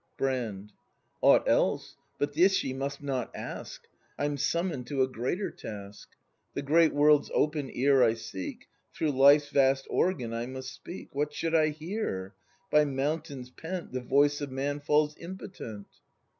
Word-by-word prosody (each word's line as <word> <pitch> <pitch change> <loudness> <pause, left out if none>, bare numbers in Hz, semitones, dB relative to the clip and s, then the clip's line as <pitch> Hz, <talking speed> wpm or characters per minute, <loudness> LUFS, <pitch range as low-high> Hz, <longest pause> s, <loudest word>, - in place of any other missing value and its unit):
Brand. 110 -7 -2 0.5
Aught - - +5
else: - - +1 0.2
but 145 0 -1
this 185 +5 +4
ye 130 - -3
must 140 +1 -4
not 130 -4 -2
ask! - - -7 0.3
I'm 145 0 -1
summoned 160 -2 -1
to 135 -3 +1
a - - +1
greater 130 - -2
task. 100 -1 -9 0.5
The - - -2
great 160 +3 +4
world's 145 0 +4
open 150 -3 +1
ear 135 +1 +3
I 115 -2 +4
seek; 95 -4 -7 0.3
Through 155 - 0
Life's 140 +2 +6
vast 135 -1 +3
organ 130 -11 0
I 115 +1 -3
must 130 0 -7
speak. 175 - -9
What 150 +1 -2
should 165 0 -2
I 155 -2 +5
here? 155 - -4 0.4
By 150 0 +6
mountains 140 -1 -3
pent 175 +5 -6
The 130 - -3
voice 145 +3 +3
of 145 - -3
man 140 +2 -2
falls 150 +1 +2
impotent. 170 - -8
140 Hz, 155 wpm, -29 LUFS, 130-150 Hz, 0.5 s, Life's